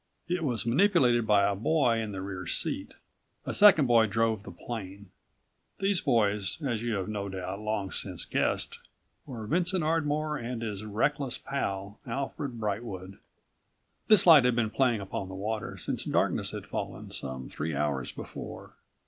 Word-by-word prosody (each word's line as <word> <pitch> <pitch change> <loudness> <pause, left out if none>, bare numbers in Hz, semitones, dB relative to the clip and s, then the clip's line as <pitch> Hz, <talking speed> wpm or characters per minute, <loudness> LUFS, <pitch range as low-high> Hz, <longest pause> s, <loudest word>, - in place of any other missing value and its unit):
It 175 -1 -1
was 120 -8 -1
manipulated 125 - +4
by 100 -2 +5
a 100 - +1
boy 120 +1 +2
in 110 -2 -3
the 95 -1 -5
rear 95 -2 -6
seat. - - -2 0.5
A - - -3
second 195 -8 +7
boy 115 -3 +5
drove 110 0 +1
the 100 - -10
plane. 100 0 -7 0.7
These 195 -2 +1
boys, 105 - +1
as 120 -5 -1
you 120 -2 -1
have 95 -2 -2
no 100 -2 -3
doubt 95 +1 -5
long 105 -2 -2
since - - -4
guessed, - - -1 0.5
were 120 -6 -6
Vincent 175 - +1
Ardmore 155 -1 0
and 120 -1 -4
his 105 -2 -4
reckless 135 +5 -1
pal, 100 -6 -4
Alfred 140 -2 -4
Brightwood. 100 -3 -4 0.9
This 215 -4 +7
light 160 -6 +9
had 125 -1 +3
been 115 -2 +1
playing 120 -5 +2
upon 95 0 -4
the 95 - -7
water 105 +3 -3
since - - -2
darkness - - +1
had - - -6
fallen, - - -5
some 65 -1 -5
three 80 0 -4
hours 70 -2 -1
before. - - -8
110 Hz, 160 wpm, -29 LUFS, 100-140 Hz, 0.9 s, light